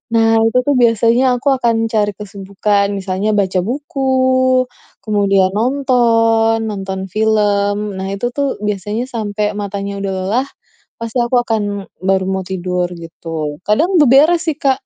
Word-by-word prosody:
Nah, 225 0 +4
itu 225 +2 +2
tuh 285 - +2
biasanya 240 +1 +3
aku 275 +2 +2
akan 230 -3 +1
cari 215 -2 0
kesibukan, 200 0 -1
misalnya 195 +1 -2
baca 190 -3 +1
buku, 260 0 +1 0.4
kemudian 200 -3 +2
nonton 230 -2 +2
nonton 195 -2 -4
film, 210 -1 0
Nah 190 - -4
itu 240 +5 -2
tuh 280 -2 -1
biasanya 210 +4 -2
sampai 210 -3 -3
matanya 200 -1 -4
udah 195 - -2
lelah 245 +8 0 0.5
pasti 230 +2 -3
aku 240 +1 0
akan 225 -3 -1 0.4
baru 190 0 +1
mau 190 0 -1
tidur, 180 -1 -2
gitu. 165 -2 -6
Kadang 325 - +2
beberes 295 +6 +5
sih, 310 -3 -1
Kak. 270 -3 +1
215 Hz, 135 wpm, -16 LUFS, 200-250 Hz, 0.5 s, beberes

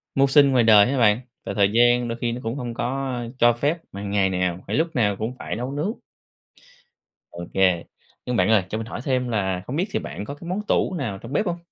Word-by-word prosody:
mưu 135 0 +4
sinh 140 0 +5
ngoài 125 -2 +4
đời 110 +1 +6
á 140 - -1
bạn, 105 -2 +4 0.3
và - - -3
thời 100 -2 +2
gian 120 +1 +4
đôi 115 0 -4
khi 120 - 0
nó 120 +1 -5
cũng 115 +2 -3
hông 120 -4 -5
có 130 +1 -3 0.2
cho 120 0 +5
phép 145 +8 0
mà 100 +1 -7
ngày 100 -1 +1
nào 90 -1 -1
phải - - -2
lúc 160 +2 0
nào 105 -5 +2
cũng 110 +5 -4
phải - - -4
nấu 125 +4 -4
nướng. 150 +8 -2 1.4
OK. 85 0 0 0.4
Nhưng 125 - -2
bạn 110 - +2
ơi, 110 -4 +4
cho 110 - -3
mình 110 0 -5
hỏi 120 - -6
thêm 130 -3 0
là 95 -5 -1
không 130 - -4
biết 180 +5 +1
thì - - 0
bạn 100 - -7
có 140 - -6
cái 170 - -11
món 195 +3 -1
tủ - - +1
nào 115 -9 -3
trong 115 +7 -10
bếp 210 - +1
hông? 175 -2 -2
120 Hz, 245 wpm, -23 LUFS, 105-135 Hz, 1.4 s, đời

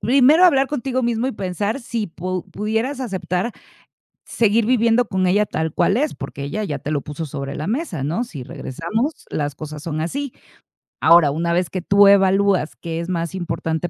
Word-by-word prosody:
primero 275 - +5
hablar 275 -6 +5
contigo 260 -3 -2
mismo 235 0 0
y 265 - -1
pensar 200 +5 -2
si 230 -3 -3
pu 180 +2 -5
pudieras 225 +6 -2
aceptar 185 -3 -2 0.8
seguir 225 0 +2
viviendo 235 -1 +3
con 190 -1 0
ella 200 +4 +3
tal 160 -5 -3
cual 190 +5 +2
es, 300 +4 0
porque 140 0 -7
ella 160 +10 -3
ya 150 -8 -3
te 150 - -5
lo 145 -2 0
puso 150 +3 -6
sobre 140 -1 -5
la 150 - -4
mesa, 220 - -2
¿no?, 170 - -1
si 145 - -8
regresamos, 215 - -3 0.2
las 145 -1 -2
cosas 150 0 -7
son 155 -2 -3
así. 275 - -3 0.7
Ahora, 165 -3 +6
una 170 +3 -1
vez 175 0 +1
que 185 - -3
tú 200 +3 +5
evalúas 195 -3 +4
qué 165 -1 -5
es 170 +1 -5
más 170 -2 -2
importante 170 -2 -2
190 Hz, 185 wpm, -21 LUFS, 165-235 Hz, 0.8 s, Ahora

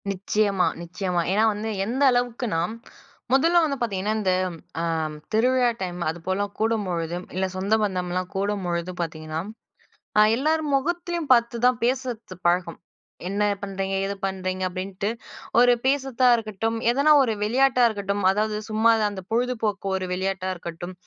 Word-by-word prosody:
நிச்சயமா 200 0 +1
நிச்சயமா. 180 +1 -2
ஏன்னா 210 +3 +3
வந்து 210 +2 -4 0.2
எந்த 255 +6 0
அளவுக்குனா, 245 -7 0 0.7
முதல்ல 330 +6 +5
வந்து 280 -3 -2
பார்த்தீங்கன்னா 210 -2 -1
இந்த 190 -3 +1 0.5
அ - - -1 0.5
திருவிழா 250 +2 +3
டைம் 180 -1 -4
அதுபோல 185 +5 -2
கூடும்பொழுது, 185 -7 -1 0.2
இல்ல 190 +1 +1
சொந்த 195 +3 0
பந்தம்லாம் 185 -2 -2
கூடும்பொழுது 185 -3 -2
பார்த்தீங்கன்னா 155 -1 -4 0.8
ஆ - - +8
எல்லார் 310 +5 +1
முகத்திலேயும் 340 +1 -1
பார்த்துதான் 240 +1 +2
பேசுறது 245 -6 -2
பழக்கம். 175 -1 0 0.5
என்ன 200 +2 0 0.2
பண்ணுறீங்க? 195 -1 -3
எது 200 - -2
பண்ணுறீங்க? 185 -1 -3
அப்பிடின்ட்டு 185 +2 -4 0.5
ஒரு 245 0 +6
பேசுறதா 265 -2 +2
இருக்கட்டு. 220 -2 -3
ம் 225 - -3
எதனா 280 +5 +4
ஒரு 230 -4 0
விளையாட்டா 255 +4 +3
இருக்கட்டும். 200 -2 -2
அதாவது 210 +2 0
சும்மா 220 +1 +4 0.2
அந்த 200 -2 -7
பொழுதுபோக்கு 225 -4 -1
ஒரு 190 -1 -2
விளையாட்டா 190 0 -2
இருக்கட்டும். 175 +1 -7
205 Hz, 130 wpm, -24 LUFS, 185-245 Hz, 0.8 s, ஆ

